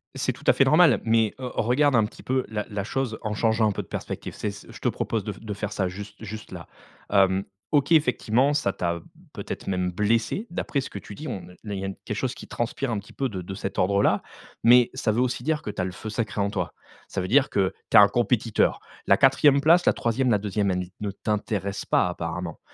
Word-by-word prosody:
C’est - - -1
tout - - -16
à - - +7
fait - - +4
normal, 155 +1 +5
mais, 115 -2 +2
heu, 130 - -4
regarde 130 +4 +3
un 110 -2 +4
petit 105 - -11
peu 130 0 0
la 105 -1 -3
la 100 -1 -3
chose 125 0 -2
en 110 -2 -3
changeant 110 +1 +2
un - - 0
peu - - -3
de - - -14
perspective. - - -5
C’est 105 - -3
c 100 - -12
je - - -11
te - - -1
propose 110 -3 -2
de 105 0 -4
de 105 +1 -7
faire 100 0 -4
ça 95 -3 0
juste 100 +3 -8
juste 110 0 -8
là. 90 -3 -8 0.4
Hem, 95 -1 +4 0.3
OK, 145 +1 +3
effectivement, 130 -3 +3
ça 145 -9 +1
t’a 85 -2 -2 0.3
peut-être - - -6
même 90 -1 0
blessé 115 - 0
d’après 165 -4 -2
ce 135 - -5
que 100 - -7
tu 100 +2 -10
dis. 155 - -7
On 105 -8 -4
ne 90 - -14 0.2
il 100 - -3
y - - -5
a 95 - -2 0.2
quelque - - -3
chose - - -2
qui - - -11
transpire 120 +3 -2
un 110 - -1
petit 100 - -13
peu 135 - -1
de 95 -6 -5
de 90 +2 -7
cet 95 0 -5
ordre 100 +2 +3
là. - - +3 0.4
Mais 120 +1 +7
ça 110 - 0
veut 110 - 0
aussi 125 -1 -1
dire 155 -1 0
que - - -6
tu 105 -2 -3
as - - 0
le 95 - -3
feu 110 +4 -7
sacré 110 0 -3
en 100 - +1
toi. 90 -5 -3 0.4
Ça - - -3
veut 90 - -3
dire 135 +7 +4
que 95 -1 +1 0.2
tu - - +7
es - - +12
un 100 - +9
compétiteur. 115 0 +1 0.3
La 100 - +6
4e 135 +3 +5
place, 170 +4 +5
la - - +5
3e, 120 +2 0
la 105 - +4
2e, 100 -1 0
elle 90 0 -2
ne 105 -1 -2
t’intéresse 100 -1 -3
pas - - +3
apparemment. 85 -1 -4
105 Hz, 250 wpm, -25 LUFS, 100-125 Hz, 0.4 s, es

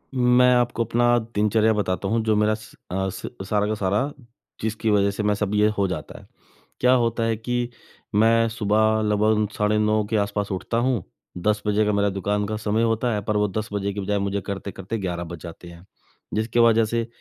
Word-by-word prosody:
मैं 125 0 +5
आपको 120 -1 +1
अपना 120 +2 +2 0.2
दिनचर्या 105 +1 +3
बताता 100 -2 -1
हूँ, 115 +2 +1
जो 110 -1 +2
मेरा 105 +1 +2
स 110 -1 -9 0.2
अ, 95 +1 -1
स 95 - -7 0.2
सारा 105 -1 +1
का 110 - 0
सारा 105 +8 0 0.5
जिसकी 110 0 -1
वज़ह 100 -1 +3
से 105 - -4
मैं 105 0 +2
सब 105 0 -2
ये 105 0 +4
हो 100 -1 +2
जाता 80 -5 -6
है। - - -18 0.5
क्या 125 +1 +4
होता 115 -2 +1
है 115 -1 0
कि 120 +2 -2 0.5
मैं 115 +2 +4
सुबह 110 0 +1
लगभग 105 0 +2
साढ़े 105 +1 +1
9 105 0 +2
के 110 - +1
आसपास 100 0 -1
उठता 95 +5 -3
हूँ। 120 -5 +1 0.4
10 105 +3 0
बजे 105 +1 +2
का 105 - +2
मेरा 100 0 +2
दुकान 100 +2 -1
का 110 +1 -3
समय 110 +1 0
होता 115 +1 +1
है, 105 - -1
पर 105 +1 -1
वो 105 0 +2
10 110 +3 -4
के 100 0 -2
बजाय 100 +1 -1
मुझे 100 0 -1
करते-करते 100 +2 -5
11 85 -3 -3
बज 85 0 -8
जाते 85 0 -10
हैं, 85 +1 -13 0.5
जिसके 110 +2 0
वज़ह 115 -1 +5
से 115 +1 -1
105 Hz, 205 wpm, -23 LUFS, 100-115 Hz, 0.5 s, मैं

